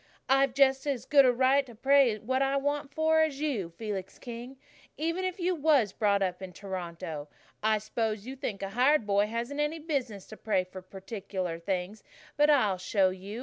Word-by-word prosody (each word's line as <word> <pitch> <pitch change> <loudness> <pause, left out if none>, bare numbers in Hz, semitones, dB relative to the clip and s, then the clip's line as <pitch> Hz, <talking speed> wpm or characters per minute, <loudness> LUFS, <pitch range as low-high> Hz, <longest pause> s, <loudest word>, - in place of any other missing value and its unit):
"I've 270 -1 +3
just 270 0 +3
as 270 -5 -2
good 280 -2 +6
a 250 - +5
right 260 +3 +3
to 240 - -12
pray 265 -1 +4
for 215 - -18
what 260 +2 0
I 275 0 +2
want 285 0 -2
as 315 -2 +2
you, 260 - -2
Felix 195 0 -6
King, 240 +2 -8 0.4
even 330 +4 -1
if 370 +1 -3
you 360 +1 +1
was 285 - +2
brought 200 -2 +2
up 180 0 -2
in 185 -1 -8
Toronto. 170 -5 -6 0.3
I 215 0 +3
s'pose 215 0 -3
you 260 +2 -6
think 230 -8 -5
a 195 - -3
hired 250 +4 +3
boy 205 0 +2
hasn't 235 +6 -4
any 295 +2 0
business 270 - -3
to 215 - -10
pray 200 -4 0
for 185 +1 -10
particular 190 -2 -5
things, 185 +4 -3 0.3
but 295 +1 +4
I'll 215 -11 +3
show 185 0 +2
you. 195 +4 -7
230 Hz, 190 wpm, -29 LUFS, 195-275 Hz, 0.4 s, good